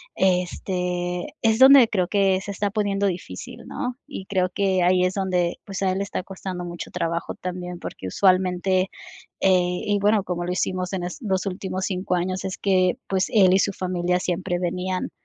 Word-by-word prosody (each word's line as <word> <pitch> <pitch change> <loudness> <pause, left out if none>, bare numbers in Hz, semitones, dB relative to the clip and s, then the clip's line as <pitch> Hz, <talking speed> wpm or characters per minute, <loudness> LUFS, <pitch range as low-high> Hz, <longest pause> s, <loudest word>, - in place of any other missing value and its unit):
este, 180 -1 -1
es 225 0 +2
donde 265 -2 +9
creo 185 -4 0
que 195 -1 +2
se 200 - -6
está 205 +1 -1
poniendo 200 -1 0
difícil, 180 -2 -6
¿no?, 250 0 -4
y 275 -10 -7
creo 185 -2 +1
que 190 -1 +1
ahí 180 +1 +4
es 185 - 0
donde, 180 -3 0
pues, 195 -1 -5
a 190 - +2
él 190 - -1
le - - 0
está 200 -2 -4
costando 190 -2 -6
mucho 175 0 -7
trabajo 170 -1 -2
también 180 -1 -6
porque 95 - -8
usualmente, 185 - +2 0.5
eh, 190 - +4 0.3
y 205 0 +2
bueno, 205 0 +3
como 175 -2 -3
lo 180 - -2
hicimos 185 0 -2
en 185 - -2
es, 180 - -5
los 190 -5 -1
últimos 190 0 -3
5 185 -1 -2
años, 185 +2 -2
es 190 +1 -4
que, 185 -2 +2
pues, 190 -1 +1
él 190 -4 +5
y - - +4
su 200 0 +1
familia 180 -1 -1
siempre 175 0 -2
venían 185 +1 -2
185 Hz, 190 wpm, -24 LUFS, 180-195 Hz, 0.5 s, donde